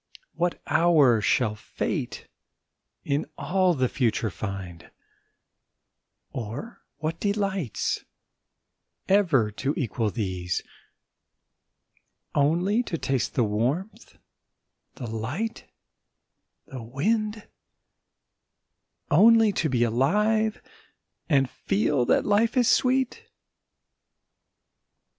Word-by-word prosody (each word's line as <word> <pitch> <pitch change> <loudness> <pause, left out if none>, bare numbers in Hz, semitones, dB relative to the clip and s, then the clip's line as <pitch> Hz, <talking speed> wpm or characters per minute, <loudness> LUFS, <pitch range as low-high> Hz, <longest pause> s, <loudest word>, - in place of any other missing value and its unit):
What 175 0 -1
hour 155 -7 +4
shall 110 +1 +2
Fate 105 - -4 0.8
in 140 +1 -1
all 180 +4 +1
the 130 -2 +1
future 115 -4 0
find, 90 -2 -7 1.4
Or 130 - -7
what 160 +2 -3
delights, 195 - -1 1.0
ever 165 - +3
to 135 +7 -2
equal 115 - -1
these: 95 -5 -3 1.7
Only 175 +10 +2
to 180 -9 -4
taste 135 -4 -1
the 125 - +3
warmth, 140 - -2 0.8
the 130 - -7
light, 125 - -4 1.0
the 130 -2 -8
wind, 210 - -1 1.6
Only 220 +6 +6
to 160 -5 -1
be 125 -2 +2
alive, 210 - +1 0.7
and 135 -4 +3
feel 120 +4 0
that - - +2
life 225 +4 +2
is 245 -2 +4
sweet? 260 0 +2
145 Hz, 85 wpm, -26 LUFS, -, 1.7 s, Only